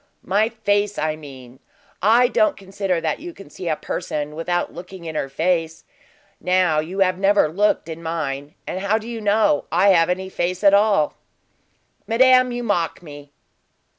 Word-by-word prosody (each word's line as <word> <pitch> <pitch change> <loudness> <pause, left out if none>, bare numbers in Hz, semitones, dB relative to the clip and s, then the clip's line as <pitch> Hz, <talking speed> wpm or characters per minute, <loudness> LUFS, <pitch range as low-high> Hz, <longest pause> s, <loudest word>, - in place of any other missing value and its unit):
"My 210 +4 +2
face, 205 -2 -1
I 155 0 -1
mean. 130 -4 -13 0.4
I 230 +6 +5
don't 310 +4 +1
consider 195 -2 -2
that - - -2
you 345 +3 -8
can 195 - -14
see 180 - -7
a 155 - +1
person 150 0 -4
without 175 +2 -2
looking 180 0 -10
in 160 - -5
her 135 -3 -3
face. 165 +2 -1 0.6
Now 180 -4 +2
you 180 +6 -3
have 185 -1 +2
never 200 -3 +3
looked 200 +6 0
in 165 0 -7
mine, 150 -3 -4
and 185 - -4
how 200 +3 +1
do 220 +1 -8
you 230 -1 -6
know 210 -7 +2
I 180 +5 +4
have 170 -3 +4
any 190 +1 -2
face 180 +1 -3
at 200 -1 +6
all?" 200 -7 +3 0.9
"Madame, 255 +2 +4
you 245 0 -4
mock 180 -6 -1
me." 145 -2 -12
185 Hz, 170 wpm, -21 LUFS, 160-205 Hz, 0.9 s, at